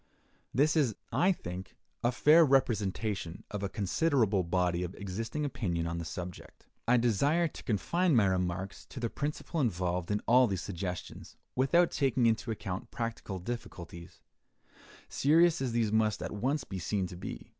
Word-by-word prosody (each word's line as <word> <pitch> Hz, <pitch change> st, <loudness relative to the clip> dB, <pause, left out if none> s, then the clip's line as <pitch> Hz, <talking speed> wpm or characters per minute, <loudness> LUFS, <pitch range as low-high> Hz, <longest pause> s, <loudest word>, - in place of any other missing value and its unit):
This 145 Hz, +7 st, +3 dB
is, 135 Hz, -9 st, +2 dB, 0.2 s
I 185 Hz, +2 st, +3 dB
think, 90 Hz, -, -6 dB, 0.3 s
a 120 Hz, -, +3 dB
fair 155 Hz, +6 st, +6 dB
representation 105 Hz, -, 0 dB
of 105 Hz, -, -4 dB
a 100 Hz, -, -2 dB
considerable 110 Hz, -, +1 dB
body 90 Hz, 0 st, 0 dB
of 90 Hz, +1 st, -4 dB
existing 110 Hz, +9 st, -4 dB
opinion 90 Hz, -11 st, -2 dB
on 85 Hz, 0 st, -3 dB
the 85 Hz, -, -5 dB
subject. 90 Hz, +3 st, -8 dB, 0.2 s
I 125 Hz, +1 st, +5 dB
desire 140 Hz, -, +2 dB
to -, -, -11 dB
confine 165 Hz, -, +1 dB
my 110 Hz, -4 st, +5 dB
remarks 95 Hz, 0 st, -2 dB
to -, -, -8 dB
the 115 Hz, -2 st, -2 dB
principle 150 Hz, +2 st, -3 dB
involved 90 Hz, -6 st, -1 dB
in 105 Hz, 0 st, +1 dB
all 125 Hz, +2 st, +6 dB
these 95 Hz, -4 st, -2 dB
suggestions, 90 Hz, -1 st, -6 dB, 0.2 s
without 170 Hz, +7 st, +3 dB
taking 130 Hz, -3 st, +1 dB
into 115 Hz, +1 st, +1 dB
account 105 Hz, 0 st, -4 dB
practical 115 Hz, -4 st, -4 dB
difficulties, 85 Hz, -5 st, -8 dB, 0.8 s
serious 165 Hz, +3 st, +4 dB
as 130 Hz, -3 st, -1 dB
these 115 Hz, -2 st, +1 dB
must 110 Hz, -1 st, +1 dB
at -, -, -4 dB
once 130 Hz, +7 st, -1 dB
be 95 Hz, -6 st, -6 dB
seen 95 Hz, +2 st, -1 dB
to 90 Hz, -, -7 dB
be. 85 Hz, -9 st, -7 dB
110 Hz, 160 wpm, -31 LUFS, 90-130 Hz, 0.8 s, fair